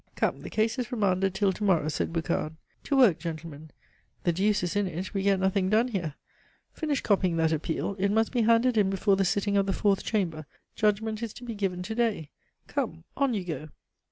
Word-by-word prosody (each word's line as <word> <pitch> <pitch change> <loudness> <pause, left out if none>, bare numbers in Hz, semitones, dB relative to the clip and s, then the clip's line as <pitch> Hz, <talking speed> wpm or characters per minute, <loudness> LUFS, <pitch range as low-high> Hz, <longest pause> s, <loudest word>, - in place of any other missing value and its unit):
"Come, - - 0
the - - -7
case 225 +3 0
is 245 - -3
remanded 195 -4 +1
till 195 -1 +2
to 210 - -6
morrow," 170 -7 +3
said 155 - -1
Boucard. 160 -1 -2 0.3
"To 280 - +1
work, 210 -11 +5
gentlemen. 155 -2 -7 0.5
The 175 - +3
deuce 200 +3 +1
is 175 +2 -2
in 205 -1 +1
it; 180 +2 -5
we 195 - 0
get 195 -1 +2
nothing 190 0 +1
done 225 +4 +3
here. 175 - -3 0.6
Finish 300 -4 -1
copying 185 -5 +2
that 160 -1 +2
appeal; 160 +5 -2
it 200 +1 +2
must 220 +1 +2
be 245 - +1
handed 230 +2 +3
in 195 -2 +3
before 195 +1 +2
the 195 - +1
sitting 200 +2 +1
of 195 0 +2
the 195 - +1
Fourth 200 -1 +1
Chamber, 165 -8 -1 0.3
judgment 215 +1 0
is 230 -3 -4
to 250 - -11
be 235 -2 -5
given 190 -3 -2
to 215 +5 -4
day. 220 -10 -1 0.3
Come, 80 - -3
on 275 -4 +1
you 195 - -2
go!" 155 -3 -5
195 Hz, 215 wpm, -28 LUFS, 175-220 Hz, 0.6 s, work